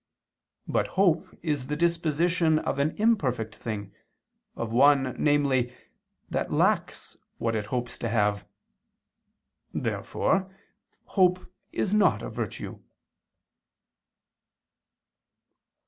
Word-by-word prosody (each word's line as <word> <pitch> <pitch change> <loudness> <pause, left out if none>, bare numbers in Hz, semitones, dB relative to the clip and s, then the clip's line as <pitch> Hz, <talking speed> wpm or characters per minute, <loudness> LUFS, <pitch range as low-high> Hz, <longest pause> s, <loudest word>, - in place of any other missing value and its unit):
But - - +1
hope 180 -2 +3 0.2
is 145 -6 -1
the 150 - -2
disposition 170 0 +2
of 140 - -2
an 150 +3 +1
imperfect 130 - +1
thing, 100 -3 -5 0.6
of 115 -1 -4
one, 135 0 +4
namely, 140 -4 +2 0.6
that - - -2
lacks - - 0 0.2
what 115 -1 -1
it 105 -1 -2
hopes 120 +2 -3
to 115 - -2
have. 105 -2 +1 1.3
Therefore 190 0 -1 0.5
hope 185 -1 +2 0.3
is 200 - -1
not 210 -1 +3
a - - -5
virtue. - - -5
145 Hz, 95 wpm, -27 LUFS, 120-170 Hz, 1.3 s, one